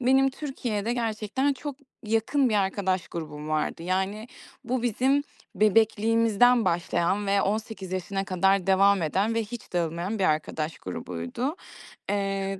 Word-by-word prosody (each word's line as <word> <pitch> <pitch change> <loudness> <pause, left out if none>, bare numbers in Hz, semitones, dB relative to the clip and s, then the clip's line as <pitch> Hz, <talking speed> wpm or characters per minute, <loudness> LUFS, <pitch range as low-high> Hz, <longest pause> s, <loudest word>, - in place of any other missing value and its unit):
Benim 265 +2 +4
Türkiye'de 240 -6 -3
gerçekten 230 +3 0
çok 280 +1 -6 0.3
yakın 225 +5 +2
bir 220 - 0
arkadaş 190 -2 0
grubum 150 -2 -6
vardı. 155 +1 -1
Yani, 190 +5 -2 0.4
bu 250 0 -1
bizim 260 +4 +2 0.3
bebekliğimizden 225 +2 +4
başlayan 175 +3 0
ve 200 0 +3
18 205 -2 -3
yaşına 190 +1 -2
kadar 190 0 +2
devam 195 0 +4
eden 195 +8 0
ve 230 - +1
hiç 235 +2 -9
dağılmayan 175 +4 -1
bir 190 - +1
arkadaş 155 0 -1
grubuydu. 90 - -4 0.5
Eee, 195 -1 -1
200 Hz, 130 wpm, -26 LUFS, 185-230 Hz, 0.5 s, Benim